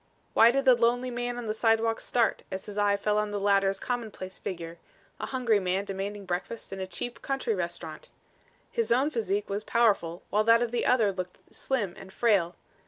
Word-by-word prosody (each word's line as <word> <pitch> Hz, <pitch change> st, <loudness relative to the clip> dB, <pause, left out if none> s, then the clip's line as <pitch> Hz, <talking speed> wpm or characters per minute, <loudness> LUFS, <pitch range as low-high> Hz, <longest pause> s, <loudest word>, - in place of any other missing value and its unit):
Why 225 Hz, -, +7 dB
did 275 Hz, +3 st, +1 dB
the 260 Hz, -, +8 dB
lonely 245 Hz, +1 st, +1 dB
man 245 Hz, 0 st, -3 dB
on 245 Hz, -, -5 dB
the 215 Hz, -, -1 dB
sidewalk 225 Hz, 0 st, +2 dB
start 235 Hz, -2 st, +1 dB
as 190 Hz, 0 st, -5 dB
his 205 Hz, -, -8 dB
eye 205 Hz, -1 st, +2 dB
fell 210 Hz, +1 st, +1 dB
on 210 Hz, 0 st, -1 dB
the 205 Hz, 0 st, -2 dB
latter's 195 Hz, -1 st, +2 dB
commonplace 220 Hz, -6 st, -5 dB
figure, 170 Hz, -2 st, -6 dB, 0.4 s
a -, -, -3 dB
hungry 245 Hz, -5 st, +2 dB
man 190 Hz, +1 st, -1 dB
demanding 200 Hz, +1 st, -5 dB
breakfast 185 Hz, +5 st, -4 dB
in 195 Hz, -, -6 dB
a 190 Hz, -, -3 dB
cheap, 210 Hz, +7 st, -5 dB
country 275 Hz, -, -1 dB
restaurant? -, -, -5 dB, 0.6 s
His 465 Hz, -1 st, -1 dB
own 265 Hz, +6 st, +3 dB
physique 210 Hz, -4 st, -1 dB
was 200 Hz, +1 st, -3 dB
powerful 200 Hz, -8 st, +1 dB
while 210 Hz, +2 st, +3 dB
that 230 Hz, +1 st, +6 dB
of 235 Hz, -, -3 dB
the 240 Hz, -, 0 dB
other 225 Hz, -5 st, +4 dB
looked 185 Hz, -1 st, -6 dB, 0.2 s
slim 220 Hz, -9 st, -1 dB
and 190 Hz, -, -11 dB
frail. 190 Hz, -7 st, +2 dB
210 Hz, 195 wpm, -28 LUFS, 195-240 Hz, 0.6 s, the